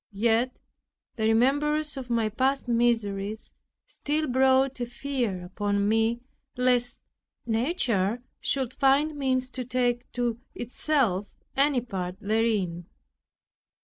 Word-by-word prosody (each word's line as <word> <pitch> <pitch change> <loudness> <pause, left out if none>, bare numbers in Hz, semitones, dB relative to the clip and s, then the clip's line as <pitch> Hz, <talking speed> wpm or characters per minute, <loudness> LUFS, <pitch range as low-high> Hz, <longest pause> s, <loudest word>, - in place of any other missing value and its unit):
Yet 230 +4 +1 0.6
the 220 -2 0
remembrance 295 +6 +2
of 260 -2 -7
my 230 -2 +1
past 260 +5 0
miseries 220 -3 0 0.3
still 305 +2 -2
brought 265 0 +3
a 240 - -1
fear 240 -8 -3
upon 200 +2 -1
me, 225 +2 +2 0.4
lest 250 -1 +2 0.5
nature 230 - 0 0.2
should 260 -2 -1
find 285 +3 +3
means 260 -2 0
to 255 - -3
take 245 -1 -1
to 240 -2 -1 0.2
itself 240 - 0 0.2
any 275 -2 +3
part 185 -6 -4
therein. 200 -6 0
240 Hz, 110 wpm, -27 LUFS, 220-265 Hz, 0.6 s, brought